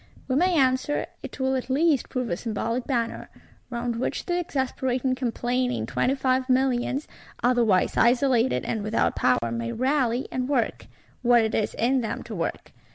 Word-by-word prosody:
We 255 - 0
may 355 +4 +3
answer, 260 +1 +2 0.2
it - - -9
will 265 0 +1
at 260 0 -3
least 290 0 +2
prove 250 -3 -2
a - - +1
symbolic 230 +4 -3
Banner; 235 -4 -2 0.4
round 235 -1 -3
which 245 - -2
the 350 0 0
exasperating 260 -4 -1
complaining 250 0 -1
Twenty 265 - 0
Five 260 -1 0
Millions, 260 +2 +1 0.4
otherwise 235 -6 +3
isolated 250 0 +3
and 220 - -2
without 215 +2 0
power, 120 -2 +1
may 115 0 -3
rally, 255 -1 0
and 255 +1 -2
work—what 240 -2 0
it 220 - -1
is 210 - 0
in 255 +4 +2
them 225 - -4
to 230 - -8
work. 170 -4 -4
250 Hz, 160 wpm, -25 LUFS, 230-265 Hz, 0.4 s, may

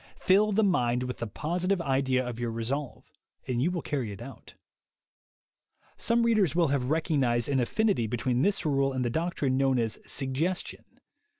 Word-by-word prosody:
Fill 205 +3 +3
the 215 +2 +2
mind 125 -10 +1
with 125 0 -4
the 115 - -3
positive 180 - -1
idea 130 -4 0
of 120 -1 -5
your 120 -1 -2
resolve, 120 +5 -4 0.4
and 125 -2 -1
you 160 - +2
will 180 -3 -3
carry 130 -7 -2
it 100 - -9
out. 120 -1 -11 1.4
Some 235 0 +1
readers 215 - +2
will 170 -4 +3
have 135 -2 0
recognized 140 -7 +1
an 140 -2 +1
affinity 195 - +1
between 120 +2 0
this 200 +3 +1
rule 135 -2 +1
and 130 -1 -1
the 120 - -1
doctrine 155 -4 -1
known 135 -1 +2
as 115 -2 -1
"sug 135 -1 -3
gestion." 175 +7 -2
135 Hz, 175 wpm, -28 LUFS, 125-175 Hz, 1.4 s, Fill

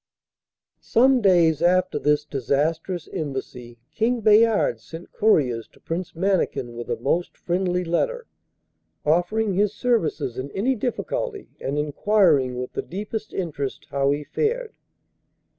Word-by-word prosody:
Some 255 +2 +3
days 170 -6 +4
after 185 +1 +2
this 150 0 +1
disastrous 155 - -1
embassy 130 -5 -5 0.2
King 235 +1 0
Bayard 215 - +4
sent 165 +9 -11
couriers 130 - +2
to - - -21
Prince 170 +1 -5
Mannikin 170 -9 0
with 120 0 -7
a - - +1
most 165 +9 -1
friendly 180 0 -1
letter, 480 - -1 0.8
offering 175 +7 +1
his 205 +2 +1
services 220 - 0
in 135 +2 -5
any 240 +7 +1
difficulty, 390 - -3
and 140 +2 -2
enquiring 150 -3 +2
with 125 0 -5
the - - -2
deepest 210 +4 -6
interest 150 -7 -4
how 140 0 +1
he 145 +1 0
fared. 450 - -2
175 Hz, 125 wpm, -23 LUFS, 145-215 Hz, 0.8 s, days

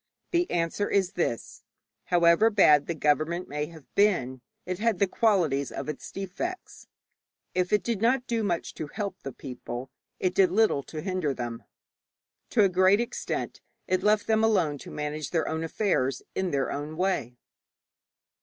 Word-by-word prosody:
The 345 0 +1
answer 170 +4 0
is 190 -2 +2
this: 170 - -3 0.4
However 175 +5 +5
bad 150 -9 +5
the 170 - -2
government 155 +4 +1
may 150 +1 -3
have 160 -3 -13
been, 135 -12 +2 0.2
it 185 0 -3
had 225 -2 +1
the 200 - +3
qualities 180 - +1
of - - -5
its 150 - -6
defects. 195 - -6 0.7
If 180 0 0
it 210 - +3
did 230 -4 -2
not 245 +2 +2
do 230 -2 -1
much 175 -5 -2
to 155 - -5
help 200 +3 -5
the 135 - -6
people, 125 0 -7 0.3
it 185 -1 0
did 190 -2 +4
little 215 -7 +3
to 155 - -6
hinder 185 -7 -1
them. 120 -1 -5 0.8
To 215 - +4
a - - +6
great 185 +3 +4
extent 235 - -3 0.3
it 185 0 +1
left 210 +1 +3
them 220 0 +2
alone 175 -10 +2
to - - -10
manage 150 0 -4
their 165 -2 0
own 160 +1 -2
affairs 145 - 0
in 190 -1 -1
their 140 -4 0
own 150 +2 -5
way. 180 -10 -1
180 Hz, 165 wpm, -27 LUFS, 150-205 Hz, 0.8 s, a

